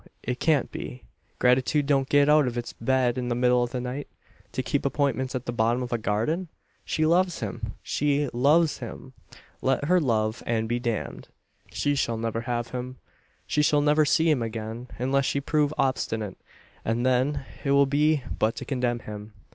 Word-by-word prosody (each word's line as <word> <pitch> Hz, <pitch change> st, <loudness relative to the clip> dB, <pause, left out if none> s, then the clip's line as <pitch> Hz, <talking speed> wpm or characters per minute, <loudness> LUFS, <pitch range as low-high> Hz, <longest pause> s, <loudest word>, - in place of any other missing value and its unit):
It 125 Hz, 0 st, -3 dB
can't 155 Hz, -5 st, +2 dB
be. 60 Hz, -, -7 dB, 0.3 s
Gratitude 130 Hz, +4 st, +3 dB
don't 135 Hz, -2 st, +1 dB
get 145 Hz, 0 st, +5 dB
out 150 Hz, -2 st, +5 dB
of 120 Hz, 0 st, -3 dB
its 120 Hz, -, -4 dB
bed 130 Hz, 0 st, +1 dB
in 125 Hz, -, -3 dB
the 120 Hz, -, 0 dB
middle 125 Hz, 0 st, +3 dB
of 120 Hz, -, 0 dB
the 125 Hz, -, -3 dB
night 125 Hz, +3 st, -4 dB, 0.4 s
to -, -, -2 dB
keep -, -, -1 dB
appointments 130 Hz, -2 st, 0 dB
at 125 Hz, -, -3 dB
the -, -, -2 dB
bottom 120 Hz, +2 st, +1 dB
of 125 Hz, -, -4 dB
a 120 Hz, -, 0 dB
garden? 115 Hz, -, -1 dB, 0.4 s
She 155 Hz, -, 0 dB
loves 175 Hz, +2 st, +2 dB
him 115 Hz, +1 st, -5 dB
she 145 Hz, 0 st, +1 dB
loves 150 Hz, +6 st, +3 dB
him! 130 Hz, -, -8 dB, 0.5 s
Let 135 Hz, +2 st, +1 dB
her 180 Hz, +4 st, +4 dB
love 110 Hz, -6 st, 0 dB
and 115 Hz, -1 st, 0 dB
be 120 Hz, +1 st, 0 dB
damned! 120 Hz, -3 st, -3 dB, 0.4 s
She 145 Hz, -, 0 dB
shall 120 Hz, -5 st, 0 dB
never 115 Hz, 0 st, -2 dB
have 120 Hz, -1 st, -2 dB
him. 125 Hz, +1 st, -5 dB, 0.5 s
She 150 Hz, -, +1 dB
shall 150 Hz, 0 st, +3 dB
never 150 Hz, +1 st, +4 dB
see 160 Hz, +3 st, +3 dB
him 150 Hz, -6 st, +3 dB
again, 115 Hz, +1 st, -5 dB
unless 135 Hz, +2 st, +1 dB
she 140 Hz, -, 0 dB
prove 150 Hz, +1 st, +1 dB
obstinate; 110 Hz, -7 st, -1 dB, 0.4 s
and 115 Hz, +2 st, 0 dB
then 130 Hz, +2 st, +1 dB, 0.2 s
it 140 Hz, -, -1 dB
will 140 Hz, 0 st, +5 dB
be 145 Hz, +1 st, +2 dB, 0.2 s
but 110 Hz, +2 st, +2 dB
to -, -, -6 dB
condemn 125 Hz, -3 st, -1 dB
him. 105 Hz, 0 st, -8 dB
130 Hz, 185 wpm, -26 LUFS, 120-145 Hz, 0.5 s, get